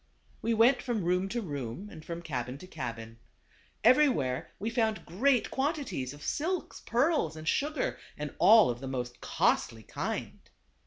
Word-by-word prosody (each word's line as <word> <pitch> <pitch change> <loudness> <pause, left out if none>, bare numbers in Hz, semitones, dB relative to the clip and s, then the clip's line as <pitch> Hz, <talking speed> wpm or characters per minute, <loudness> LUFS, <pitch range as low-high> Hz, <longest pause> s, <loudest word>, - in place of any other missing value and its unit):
We 230 0 +1
went 240 +4 +5
from 235 -7 -2
room 180 +2 +1
to 235 +2 -2
room, 145 - -5
and 160 -2 -10
from 170 +1 -6
cabin 125 -4 -4
to 165 - -11
cabin. 115 -8 -6 0.6
Everywhere 230 - +4
we 220 +4 -3
found 225 -2 0
great 240 - +2
quantities 265 - -2
of 145 +1 -11
silks, 350 +4 -2
pearls, 245 - +2
and 155 0 -8
sugar; 295 - 0 0.2
and 150 -1 -5
all 220 - +7
of 120 - -6
the 135 - -6
most 125 -2 -4
costly 110 -1 +1
kind. - - -4
180 Hz, 155 wpm, -30 LUFS, -, 0.6 s, all